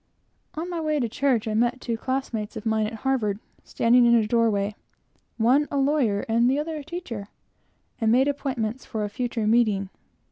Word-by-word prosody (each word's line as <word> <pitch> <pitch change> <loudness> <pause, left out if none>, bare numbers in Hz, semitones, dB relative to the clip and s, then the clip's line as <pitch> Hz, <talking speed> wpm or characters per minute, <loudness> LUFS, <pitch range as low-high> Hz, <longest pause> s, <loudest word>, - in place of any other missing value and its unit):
On 320 +3 -4
my 345 -2 -3
way 305 -1 0
to 240 - 0
church, 245 -1 0
I 215 - -1
met 240 +3 +1
two 235 -2 -3
classmates 235 -3 -3
of 215 - -8
mine 220 -1 +1
at 220 - -7
Harvard 225 -7 +1 0.3
standing 240 +1 +3
in 235 - +6
a 225 -2 +3
door 230 +1 +2
way, 200 0 -1 0.6
one 255 +6 +3
a 285 - -2
lawyer 270 -7 +2
and 235 +2 +3
the 270 - +2
other 310 +1 -3
a 295 - -7
teacher, 280 - -6 0.7
and 225 -2 +2
made 260 +4 +4
appointments 260 -5 -2
for 220 -1 -4
a 205 - -2
future 235 0 -2
meeting. 210 -4 +2
235 Hz, 190 wpm, -25 LUFS, 220-270 Hz, 0.7 s, in